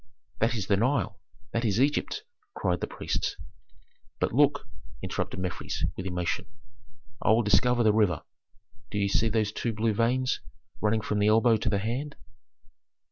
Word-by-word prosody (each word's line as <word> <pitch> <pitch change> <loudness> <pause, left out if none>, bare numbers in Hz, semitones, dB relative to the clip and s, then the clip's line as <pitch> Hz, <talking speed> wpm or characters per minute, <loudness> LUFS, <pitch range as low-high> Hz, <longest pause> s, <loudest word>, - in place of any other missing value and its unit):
"That 115 +3 +2
is 105 -5 -2
the 100 0 +2
Nile! 110 -4 0 0.3
That 115 - -1
is 110 -1 +1
Egypt!" 150 - +1 0.3
cried - - 0
the - - -1
priests. - - -2 0.8
"But - - 0
look," 145 -2 +3 0.4
interrupted - - -3
Mefres, 90 -1 -3
with 95 - -4
emotion. 90 -1 -2 0.7
"I - - +1
will 110 +2 +5
discover 120 +4 +3
the 110 -1 +4
river. 100 -8 +2 0.7
Do 105 - -4
ye 100 -1 +2
see 110 +3 +2
those 110 -1 +1
two 115 +1 -2
blue 110 +1 +1
veins 125 +4 +1 0.4
running 110 +1 +2
from 105 0 -1
the 105 - +3
elbow 115 +2 +5
to - - -1
the 100 - +1
hand? 125 +8 -3
110 Hz, 160 wpm, -28 LUFS, 100-120 Hz, 0.8 s, will